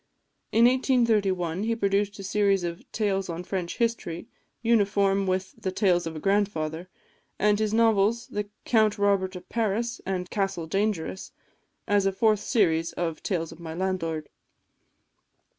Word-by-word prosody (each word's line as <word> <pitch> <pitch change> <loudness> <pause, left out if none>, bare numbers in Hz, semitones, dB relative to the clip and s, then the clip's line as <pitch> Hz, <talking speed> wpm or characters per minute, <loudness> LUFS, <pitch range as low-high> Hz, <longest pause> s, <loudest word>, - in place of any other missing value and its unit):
In 230 +2 +5
1831 215 -9 +2
he 230 +2 0
produced 200 -1 0
a 195 - -8
series 195 -1 +2
of 170 0 -6
"Tales 195 -3 -1
on 170 +1 -4
French 180 -2 -4
History," 225 -8 -1 0.4
uniform 200 -3 +2
with 185 +5 -1
the 205 -5 -4
"Tales 180 -4 +2
of 165 - -6
a - - -5
Grandfather," 180 -3 -1 0.5
and 210 0 +3
his 215 -1 0
novels, 225 0 +3 0.4
"Count 215 -2 +3
Robert 200 -2 +1
of 180 0 -9
Paris," 230 +2 -1
and 185 -1 -3
"Castle 195 -4 -1
Dangerous," 195 0 -2 0.6
as 205 -1 +3
a - - +2
fourth 215 +2 +2
series 170 -8 +1
of 165 -2 -3
"Tales 165 -5 -2
of - - -12
My 160 -1 -7
Landlord." 165 -4 -2
195 Hz, 140 wpm, -26 LUFS, 180-215 Hz, 0.6 s, In